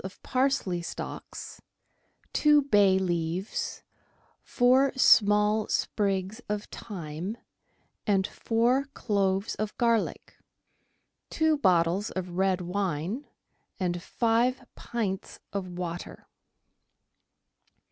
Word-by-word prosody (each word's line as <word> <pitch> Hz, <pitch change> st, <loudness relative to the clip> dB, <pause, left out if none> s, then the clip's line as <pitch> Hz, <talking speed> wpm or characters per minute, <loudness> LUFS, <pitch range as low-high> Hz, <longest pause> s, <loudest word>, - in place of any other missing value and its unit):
of 190 Hz, 0 st, -8 dB
parsley 255 Hz, -9 st, 0 dB
stalks, 170 Hz, -, -7 dB, 0.7 s
two 295 Hz, -1 st, +5 dB
bay 205 Hz, -7 st, +4 dB
leaves, 175 Hz, +1 st, -2 dB, 0.6 s
four 255 Hz, +2 st, +3 dB
small 210 Hz, -3 st, +5 dB
sprigs 200 Hz, +1 st, -1 dB
of 210 Hz, 0 st, -1 dB
thyme, 180 Hz, +1 st, -6 dB, 0.7 s
and 195 Hz, -2 st, +3 dB
four 240 Hz, +6 st, +1 dB
cloves 195 Hz, -2 st, 0 dB
of 215 Hz, -1 st, -4 dB
garlic; 230 Hz, -2 st, 0 dB, 0.9 s
two 315 Hz, -1 st, +2 dB
bottles 185 Hz, -, +2 dB
of 185 Hz, -1 st, -4 dB
red 185 Hz, +1 st, +1 dB
wine 185 Hz, -, -2 dB, 0.5 s
and 175 Hz, -2 st, -1 dB
five 240 Hz, +5 st, +1 dB
pints 205 Hz, -5 st, -4 dB
of 195 Hz, -2 st, -3 dB
water. 175 Hz, -1 st, -6 dB
200 Hz, 85 wpm, -28 LUFS, 185-235 Hz, 0.9 s, two